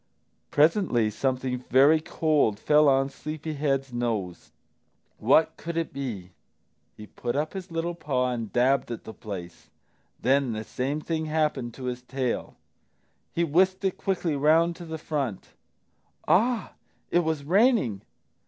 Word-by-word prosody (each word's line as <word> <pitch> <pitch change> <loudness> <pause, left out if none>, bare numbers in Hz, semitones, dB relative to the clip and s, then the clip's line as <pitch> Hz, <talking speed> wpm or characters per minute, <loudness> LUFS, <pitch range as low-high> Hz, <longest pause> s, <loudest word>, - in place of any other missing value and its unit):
Presently 145 - +3
something 130 +1 -1
very 140 +5 +6
cold 150 -10 +1
fell 150 +4 +5
on 135 0 +3
Sleepy 155 +1 -6
head's 135 -3 -1
nose. 110 -7 -3 0.7
What 155 +7 +4
could 170 0 -5
it 165 - -2
be? 115 -10 -5 0.7
He 105 - -9
put 120 +3 -4
up 150 +2 -1
his 190 -1 -6
little 165 +1 -2
paw 130 -6 -1
and 115 -4 -4
dabbed 130 +2 +2
at 115 - -6
the 110 - -9
place. 95 -6 -8 0.5
Then 130 -1 +2
the 110 0 -4
same 135 +7 -3
thing 160 0 -2
happened 150 -6 -1
to 130 - -9
his 125 -1 -3
tail. 125 -1 -3 0.8
He 170 - +2
whisked 185 +5 +2
it 190 - 0
quickly 180 -5 -1
round 160 +4 +3
to 175 - -9
the 160 -1 -5
front. 140 - -3 0.8
Ah, 230 +2 +2 0.4
it 175 - +4
was 160 -4 -1
raining! 185 - +3
140 Hz, 145 wpm, -26 LUFS, 125-160 Hz, 0.8 s, very